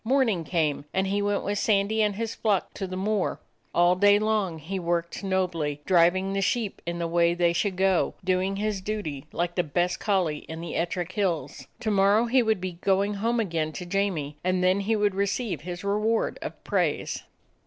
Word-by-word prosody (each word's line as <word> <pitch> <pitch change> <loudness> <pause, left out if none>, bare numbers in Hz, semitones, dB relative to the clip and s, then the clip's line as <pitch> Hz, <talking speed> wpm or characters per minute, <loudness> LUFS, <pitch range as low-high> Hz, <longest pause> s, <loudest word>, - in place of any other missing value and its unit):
Morning 230 -7 +2
came, 155 -4 0
and 190 +1 +2
he 200 +1 0
went 205 0 0
with 205 0 -1
Sandy 210 +1 +2
and 210 -2 +1
his 225 +1 -3
flock 210 -5 0
to 195 - -4
the 185 0 -5
moor. 205 0 0 0.3
All 175 +1 +4
day 205 +2 +5
long 210 -5 0
he 180 +5 -4
worked 170 +1 -2
nobly, 175 -6 -1
driving 185 +2 +3
the 195 - 0
sheep 215 +1 -1
in 170 0 -2
the 170 - -2
way 170 0 +2
they 175 -1 +2
should 190 +2 0
go, 190 -1 +2
doing 185 +1 +1
his 205 -1 -2
duty 185 -10 -4
like 175 0 -1
the 180 - +2
best 175 +3 -1
collie 180 -8 +1
in 160 0 -6
the 170 -1 -5
Ettrick 175 +1 -2
Hills. 185 -6 -2
To 220 -2 0
morrow 200 +3 +4
he 250 +2 +3
would 220 -4 +1
be 180 -2 -5
going 200 +1 +2
home 230 +4 0
again 165 -7 -1
to 180 - -6
Jamie, 175 -6 -1
and 185 0 +1
then 185 +2 +3
he 215 +3 +1
would 205 -2 +2
receive 200 +2 -1
his 175 +2 -6
reward 210 +3 0
of - - -7
praise. - - -1
190 Hz, 195 wpm, -26 LUFS, 175-205 Hz, 0.3 s, day